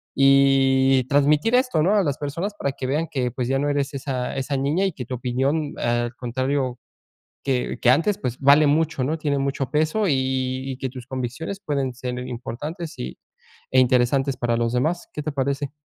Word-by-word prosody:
y 135 -1 +4
transmitir 150 - +3
esto, 250 - +2
¿no?, 200 +5 +3
a 205 - +4
las 145 -4 -1
personas 165 +8 -3
para 140 - 0
que 130 - -5
vean 155 +5 0
que, 125 -3 -1
pues 125 0 -3
ya 135 - +2
no 145 - 0
eres 145 0 -1
esa 130 -2 -3
esa 135 +1 -2
niña 150 +8 +1
y 190 - 0
que 130 -4 -6
tu 125 - -4
opinión 135 +5 -1
al 120 0 0
contrario 130 +1 -2 0.7
que 130 -2 -1
que 120 - +4
antes, 165 +9 +2
pues 125 - -3
vale 145 +2 +6
mucho, 145 -2 +1
¿no?, 155 +4 -1
tiene 145 -3 -1
mucho 135 -1 -2
peso 155 +8 +1
y 130 -2 -1
y - - -9
que 130 0 -3
tus 125 -1 -10
convicciones 130 +10 -4
pueden 140 -6 -2
ser 125 0 -5
importantes 150 - -6
y 65 +1 -5 0.6
e 130 - +6
interesantes 130 +2 +2
para 120 -1 0
los 115 0 0
demás. 160 +8 0
¿Qué 150 - -4
te 155 - -2
parece? 140 0 -1
135 Hz, 195 wpm, -23 LUFS, 130-150 Hz, 0.7 s, vale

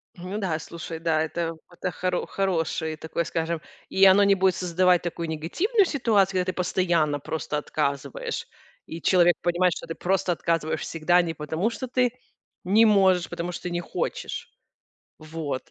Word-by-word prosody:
Ну 185 +3 -6
да, 175 -6 -1
слушай, 165 0 -7
да, 160 -1 +1
это 165 0 -3
это 180 +1 -4
хоро 180 +1 -2
хороший 165 -4 -1
такой, 160 +2 -3
скажем. 165 0 -2 0.3
И 195 0 +5
оно 195 +2 +7
не 200 0 +5
будет 190 -1 +2
создавать 180 0 +2
такую 170 -1 -4
негативную 345 - +1
ситуацию, 205 - +2
когда 180 - 0
ты - - -16
постоянно 170 -5 +1
просто 150 0 -3
отказываешь, 140 -2 -3 0.4
и 165 +1 -8
человек 175 -2 +4
понимает, 175 0 +2
что - - -8
ты 165 - -5
просто 185 0 0
отказываешь 165 -2 -1
всегда 170 +2 +2
не 165 -1 -3
потому, 160 +8 -2
что 260 - -5
ты 250 -1 +2 0.5
не 210 +5 +5
можешь, 190 -4 +4
а - - -16
потому, 175 +1 -4
что - - -7
ты 180 - -3
не 175 0 -1
хочешь. - - -4 0.7
Вот. 155 -1 -5
175 Hz, 170 wpm, -25 LUFS, 160-190 Hz, 0.7 s, оно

